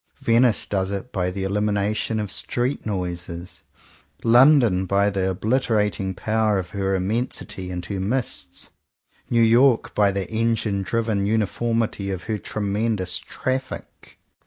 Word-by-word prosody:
Venice 115 Hz, -1 st, +3 dB
does 95 Hz, -2 st, -1 dB
it 100 Hz, +5 st, -5 dB
by 90 Hz, -2 st, -1 dB
the 95 Hz, +1 st, -4 dB
elimination 105 Hz, +2 st, 0 dB
of 105 Hz, -3 st, -3 dB
street 125 Hz, +4 st, -1 dB
noises; 90 Hz, -3 st, -5 dB, 0.6 s
London 120 Hz, -6 st, +5 dB
by 100 Hz, +1 st, +2 dB
the 95 Hz, -1 st, 0 dB
obliterating 105 Hz, -2 st, 0 dB
power 110 Hz, 0 st, +1 dB
of 90 Hz, -2 st, -4 dB
her 95 Hz, -1 st, -1 dB
immensity 95 Hz, -1 st, -2 dB
and 90 Hz, -1 st, -5 dB
her 100 Hz, 0 st, -4 dB
mists; 115 Hz, +6 st, -3 dB, 0.6 s
New 115 Hz, -1 st, +4 dB
York 120 Hz, +2 st, +4 dB
by 100 Hz, -1 st, +3 dB
the 100 Hz, -1 st, -3 dB
engine 110 Hz, -3 st, 0 dB
driven 110 Hz, -1 st, -1 dB
uniformity 110 Hz, -1 st, 0 dB
of 95 Hz, -2 st, -4 dB
her 110 Hz, -2 st, -3 dB
tremendous 100 Hz, -3 st, -1 dB
traffic. 130 Hz, 0 st, -5 dB
105 Hz, 130 wpm, -23 LUFS, 95-115 Hz, 0.6 s, London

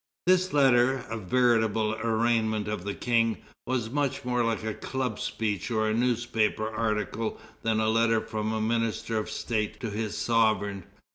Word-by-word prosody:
This 185 Hz, +1 st, +3 dB
letter, 130 Hz, -2 st, +4 dB
a 115 Hz, -, -2 dB
veritable 110 Hz, 0 st, +2 dB
arraignment 110 Hz, -1 st, +1 dB
of 105 Hz, -4 st, -3 dB
the 100 Hz, -, -3 dB
King, 115 Hz, -2 st, +1 dB, 0.3 s
was 120 Hz, -3 st, -1 dB
much 140 Hz, -2 st, -1 dB
more 125 Hz, -1 st, +1 dB
like 115 Hz, -1 st, -1 dB
a 110 Hz, 0 st, -2 dB
club 130 Hz, -3 st, -3 dB
speech 105 Hz, -5 st, -2 dB
or 110 Hz, -2 st, +1 dB
a 110 Hz, -, +1 dB
newspaper 115 Hz, -2 st, +1 dB
article 110 Hz, 0 st, -2 dB, 0.2 s
than 110 Hz, -1 st, +1 dB
a 110 Hz, -, +1 dB
letter 115 Hz, 0 st, +3 dB
from 110 Hz, -1 st, -3 dB
a 110 Hz, -, -1 dB
minister 115 Hz, 0 st, 0 dB
of 105 Hz, -, -4 dB
state 110 Hz, -2 st, -2 dB
to 115 Hz, -, -3 dB
his 105 Hz, 0 st, -3 dB
sovereign. 110 Hz, -4 st, +1 dB
115 Hz, 160 wpm, -27 LUFS, 110-120 Hz, 0.3 s, letter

